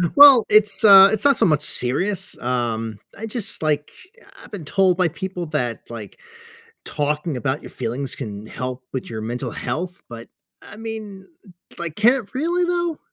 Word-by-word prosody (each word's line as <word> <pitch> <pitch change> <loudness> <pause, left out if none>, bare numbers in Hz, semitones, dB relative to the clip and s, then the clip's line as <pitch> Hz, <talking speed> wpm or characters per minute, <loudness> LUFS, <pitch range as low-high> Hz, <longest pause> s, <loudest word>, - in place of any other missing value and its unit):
Well, 280 -5 +9
it's, 210 0 +4
uh, 195 -2 +9
it's 220 +4 -2
not 280 -3 +5
so - - +3
much 150 -4 +2
serious. 175 +13 -2
Um, 115 -3 -2 0.2
I 225 - -6
just, 220 -7 -3
like, 150 -1 -1 0.3
I - - -18
I've - - -15
been 185 -7 -7
told 185 +2 +2
by 180 -2 +3
people 175 +2 -5
that, 125 -7 -2
like, 115 -3 -9 0.7
talking 150 0 -2
about 135 +4 -2
your - - -10
feelings 130 +4 -4
can 105 -4 -7
help 125 +2 -6
with 130 - -5
your 110 -2 -6
mental 120 +3 -4
health, 175 +12 -5
but, 115 0 -10 0.3
I 205 - -12
mean, 215 -3 -7 0.5
like, 170 -3 -5
can 230 +4 +5
it 255 -3 -6
really, 345 +6 0
though? 345 -2 -1
165 Hz, 175 wpm, -21 LUFS, 125-210 Hz, 0.7 s, Well